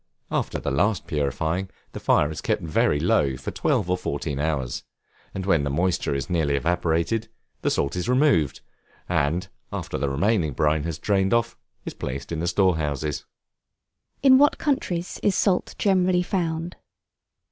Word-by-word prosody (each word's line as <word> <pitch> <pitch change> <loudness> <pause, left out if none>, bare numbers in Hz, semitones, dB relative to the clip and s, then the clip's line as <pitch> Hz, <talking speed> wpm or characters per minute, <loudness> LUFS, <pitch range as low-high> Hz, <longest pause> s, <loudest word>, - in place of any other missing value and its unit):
After - - -1
the 70 - -3
last 95 +6 +1
purifying 80 +6 -1 0.2
the - - -7
fire 75 - +3
is 80 - -6
kept - - -1
very 75 -2 +2
low 70 -2 +2
for 65 - -5
twelve - - 0
or 90 - +2
fourteen 75 -4 -3
hours, 75 -5 -2 0.5
and 95 -1 -5
when 85 -6 +3
the 70 - -1
moisture 85 0 0
is 70 - -3
nearly 80 -6 +1
evaporated 85 +8 0 0.3
the - - +1
salt 70 0 0
is 90 +6 -2
removed, 125 - +3 0.5
and, 85 +2 0 0.2
after - - -4
the 70 - 0
remaining 80 +1 +1
brine 75 +2 +1
has 85 -3 -3
drained 95 +3 +2
off, 115 - 0 0.3
is - - -5
placed 70 +5 -5
in 80 - -2
the 85 - -1
store 90 -1 +3
houses. 75 -1 -2 1.0
In 265 -1 +7
what 290 +1 +4
countries 180 - -1
is 200 - +2
Salt 190 -3 +1
generally 185 -2 +3
found? 170 -2 -2
85 Hz, 160 wpm, -24 LUFS, 75-115 Hz, 1.0 s, In